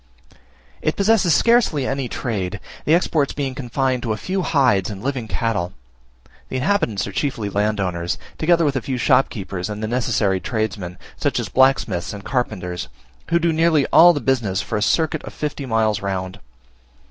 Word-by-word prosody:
It 155 - 0
possesses 200 -3 +3
scarcely 230 - +3
any 135 -2 -2
trade; 105 -6 -3 0.3
the 155 - +5
exports 155 -5 +1
being 140 -2 -3
confined 130 0 -1
to 115 -2 -1
a - - -4
few 185 - -2
hides 125 - +2
and 100 0 -7
living 130 -4 -2
cattle. 105 -7 -1 0.8
The - - -5
inhabitants 130 - 0
are 100 - -6
chiefly 115 -4 -2
landowners, 95 -4 -1 0.2
together 170 0 +3
with 140 -2 +1
a 130 - 0
few 130 +2 -3
shopkeepers 100 -7 0
and 105 +1 -5
the - - -1
necessary 110 -5 +1
tradesmen, 100 -5 -3 0.2
such - - 0
as - - -4
blacksmiths 130 -10 +2
and 100 -1 -9
carpenters, 90 -9 -2 0.4
who 170 - +3
do 170 -1 +1
nearly 160 -3 +3
all 175 +1 +9
the 145 -4 -2
business 115 -8 0
for - - -3
a 105 - 0
circuit 155 +6 +1
of - - -9
fifty 145 -2 -4
miles 110 -3 +1
round. 95 -1 -3
125 Hz, 170 wpm, -21 LUFS, 100-145 Hz, 0.8 s, all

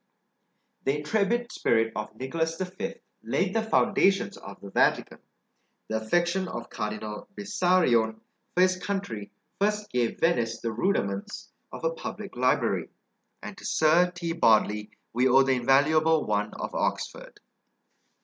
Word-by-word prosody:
The 135 +2 +1
intrepid 220 +10 0
spirit 115 -1 +1
of 105 0 -5
Nicholas 160 +7 -2
V. 185 0 -4 0.3
laid - - 0
the 225 - +2
foundations 195 -3 +2
of 100 - -11
the 100 - -10
Vatican; - - +1 0.7
the 110 - 0
affection 175 +10 +1
of 120 -6 -7
Cardinal 105 0 -5
Bessarion 175 - +2 0.4
for 180 - +4
his 185 0 +4
country 180 - -4 0.3
first 210 +1 0
gave 120 -2 0
Venice 115 -9 +1
the 115 - -3
rudiments 100 - -2 0.2
of - - -9
a - - +1
public - - -7
library; - - +1 0.5
and - - -7
to - - -14
Sir 170 +3 +3
T. 175 -2 -4
Bodley 105 -7 +3 0.2
we 125 +3 +3
owe 135 +1 +6
the 135 - +1
invaluable 150 +5 +3
one 105 0 0
of - - -5
Oxford. - - -3
150 Hz, 135 wpm, -27 LUFS, 110-185 Hz, 0.7 s, owe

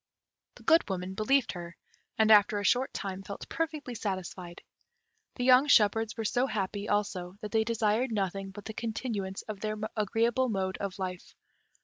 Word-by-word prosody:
The - - -15
Good 325 -8 +4
Woman 185 0 -3
believed 245 +5 +2
her, 170 -1 -8 0.4
and 220 0 +4
after 210 0 +6
a 205 - -2
short 250 +6 +2
time 195 -1 -5
felt 200 +1 -8
perfectly 310 -6 -3
satisfied. 185 -4 -5 0.7
The 245 - -3
young 255 +3 +6
shepherds 225 -2 +4
were 225 - -3
so 245 +5 +1
happy 205 -2 -3
also 190 -3 -1
that 210 - -6
they 220 -1 +3
desired 225 +2 +1
nothing 195 -2 -2
but 200 +1 -10
the 220 - -5
continuance 215 -4 -4
of 215 -2 -7
their 215 +1 -3 0.2
agreeable 230 +4 +1
mode 190 -3 -1
of 200 -2 -4
life. 185 -2 -6
210 Hz, 165 wpm, -30 LUFS, 195-230 Hz, 0.7 s, after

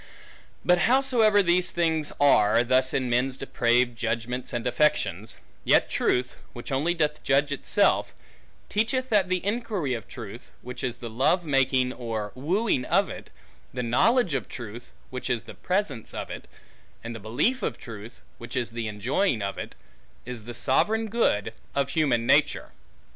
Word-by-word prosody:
But 180 0 +4
howsoever 235 -6 +4
these 180 +1 +2
things 160 -3 0
are 120 -5 +5
thus 130 +2 +2
in 130 -2 0
men's 125 +2 +1
depraved 120 -2 +1
judgments, 120 +2 -3
and 120 0 -3
affections, 115 - 0 0.3
yet - - +3
truth, 125 0 0 0.2
which 120 +3 -8
only 150 +6 +1
doth 150 -2 0
judge 140 +2 +2
itself, 140 - +2 0.6
teacheth 255 +5 0
that 205 -5 +3
the 185 0 -1
inquiry 205 - -1
of 115 -2 -5
truth, 115 -1 -9
which 125 0 -7
is 125 -2 -2
the 120 - -7
love 135 +9 +2
making, 130 -3 +2
or 110 -4 -4
wooing 165 - 0
of 195 +4 +2
it, - - -9 0.5
the 125 - -2
knowledge 185 - +3
of 135 - -2
truth, 120 0 -8 0.2
which 130 +1 -5
is 120 -2 0
the - - -10
presence 180 - -2
of - - -5
it, - - -8 0.6
and 115 +1 -5
the 115 - -7
belief 125 - 0
of - - -2
truth, 110 -2 -10 0.2
which 120 +2 -8
is 120 -2 -1
the 115 -1 -4
enjoying 110 - 0
of 100 0 -4
it, - - -7 0.5
is 120 -3 -7
the 120 0 -7
sovereign 220 - +1
good 110 - +1 0.2
of 140 -1 +1
human 135 -6 +1
nature. - - +2
130 Hz, 160 wpm, -26 LUFS, 120-175 Hz, 0.6 s, are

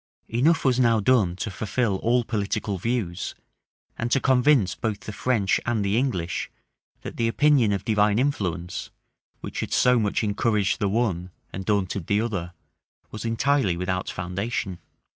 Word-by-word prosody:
Enough 145 +9 +2
was 130 -1 +3
now 115 -3 +4
done 105 -5 +3
to 100 +3 -4
fulfil 110 +1 -1
all 120 +4 +2
political 105 -3 -2
views, 105 -5 -2 0.6
and 115 - -1
to 135 - +3
convince 130 -6 +3
both 110 -3 -3
the 105 - -7
French 105 -2 +1
and 115 -4 0
the 100 +1 +1
English, 115 -9 -1 0.5
that - - -7
the 115 - +1
opinion 135 -2 +3
of 100 -1 -2
divine 105 -1 +3
influence, 95 - -2 0.5
which - - -6
had - - -3
so 125 -1 +4
much 105 0 0
encouraged 105 -2 +1
the 100 - +1
one 95 -5 0 0.2
and 95 0 -5
daunted 100 -4 -1
the 105 - +2
other, 100 -7 -2 0.6
was 110 +1 -6
entirely 115 -4 +1
without 90 +1 -2
foundation. 90 +1 -3
105 Hz, 155 wpm, -25 LUFS, 95-120 Hz, 0.6 s, now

